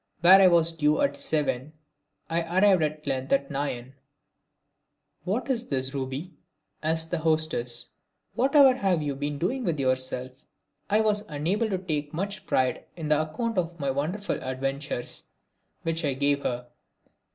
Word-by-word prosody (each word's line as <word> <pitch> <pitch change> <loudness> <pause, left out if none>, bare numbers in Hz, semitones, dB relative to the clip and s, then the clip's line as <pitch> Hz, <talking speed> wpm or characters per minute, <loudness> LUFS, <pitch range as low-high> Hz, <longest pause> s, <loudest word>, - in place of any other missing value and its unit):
Where 185 +3 +8
I 190 - +8
was 170 -2 +4
due 150 -2 +1
at 140 0 +2
seven 150 -1 -1 0.5
I 165 +1 0 0.2
arrived 195 -3 +5
at 155 0 -2
length 135 -1 -2
at 140 0 +1
nine. 135 -3 -3 1.3
"What 210 +8 -1
is 245 -3 -1
this, 130 -1 -1
Ruby?" 135 +6 -4 0.5
asked 160 +1 0
my 175 - 0
hostess. 155 -7 0 0.4
"Whatever 275 +1 +6
have 185 -9 +1
you 145 -2 -2
been 145 +1 -3
doing 245 - -1
with 165 -7 -1
yourself?" 130 0 -2 0.4
I 210 +2 +4
was 210 -1 +1
unable 180 +10 0
to 190 - 0
take 155 -5 -3
much 195 +2 -4
pride 130 -1 +1
in 160 -3 -5
the 150 0 +4
account 220 +7 -2
of 170 -1 -3
my 140 -2 0
wonderful 165 +10 -2
adventures 135 0 -3 0.6
which 165 0 -1
I 140 -3 0
gave 140 +1 +1
her. 125 -2 -3
155 Hz, 150 wpm, -27 LUFS, 135-185 Hz, 1.3 s, Where